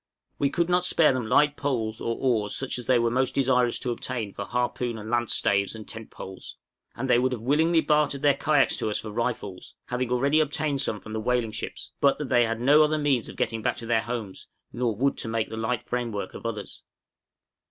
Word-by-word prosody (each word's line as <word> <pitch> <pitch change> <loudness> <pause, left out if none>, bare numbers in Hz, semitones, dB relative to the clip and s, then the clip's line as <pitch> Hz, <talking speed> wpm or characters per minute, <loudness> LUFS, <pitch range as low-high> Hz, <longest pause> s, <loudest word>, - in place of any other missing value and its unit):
We 140 - +2
could 170 +3 0
not 180 0 +2
spare 165 -5 +4
them 125 -3 -2
light 145 +5 +4
poles 115 -6 -2
or 115 - -1
oars 110 -6 0
such 135 -2 -2
as 120 - -8
they 130 - +5
were 115 -1 +1
most 130 +1 0
desirous 125 -3 +2
to 125 - -2
obtain 115 -4 -4
for 100 - -5
harpoon 120 0 -2
and 110 +1 -7
lance 120 -1 +1
staves 100 +1 +1
and 110 -1 -9
tent 115 -1 -7
poles; 95 0 -9 0.4
and 135 - -3
they 120 - +4
would 130 +1 +1
willingly 160 +7 +3
have - - -14
bartered 150 -2 +2
their 145 -1 +5
kayaks 145 0 +2
to - - -1
us 105 - -1
for 110 - -7
rifles 105 -4 -4
(having 125 0 -2
already 140 +5 +3
obtained 150 -2 0
some 105 -6 -1
from 110 +3 -10
the 110 - -2
whaling 120 -1 0
ships), - - -6
but 140 -1 +4
that 150 -4 -5
they 120 -1 +4
had 115 0 -2
no 145 +5 +5
other 155 0 +3
means 140 -6 +1
of - - -9
getting 115 -1 -1
back - - -1
to 120 - -7
their 115 -1 +2
homes, 115 -5 -6 0.3
nor 120 -3 -1
wood 135 +6 0
to - - -2
make 115 -1 -1
the - - -4
light 110 +1 -2
framework 115 -6 -3
of - - -6
others. 105 -3 -6
125 Hz, 225 wpm, -26 LUFS, 110-140 Hz, 0.4 s, they